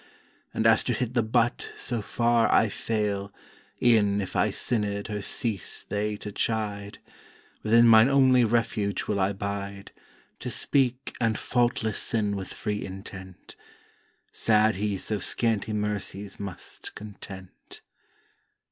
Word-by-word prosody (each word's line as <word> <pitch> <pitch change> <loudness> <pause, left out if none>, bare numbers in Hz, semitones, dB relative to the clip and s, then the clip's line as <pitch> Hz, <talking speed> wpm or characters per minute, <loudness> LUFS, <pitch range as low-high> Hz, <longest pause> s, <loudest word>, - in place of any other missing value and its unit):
And 110 - -2
as 115 -1 +5
to 125 - +1
hit 120 +1 -2
the 120 - +3
butt 115 +2 0
so 120 -3 -2
far 115 +2 +2
I 110 - +4
fail 100 -2 -2 0.5
E'en 105 -4 +4
if 95 - -5
I - - +3
sinnèd 105 -4 -1
her 105 -1 -3
cease 110 0 -1
they 105 +1 -2
to 105 - -7
chide: 105 -2 -2 0.6
Within 115 +2 +5
mine 110 +2 +7
only 130 -2 +5
Refuge 110 -3 0
will 105 -2 -1
I 95 +1 +2
'bide 100 0 -5 0.5
To - - -5
speak 130 -1 +1
and 115 -2 +2
faultless 120 -3 0
sin 105 -3 0
with 95 -1 -6
free 105 -1 -3
intent. 95 -1 -9 0.8
Sad 110 0 +3
he 100 +1 -1
so 105 +2 -2
scanty 110 -1 0
mercies 105 -1 -3
must 100 -3 -6
content! 95 -3 -10
105 Hz, 130 wpm, -27 LUFS, 100-115 Hz, 0.8 s, mine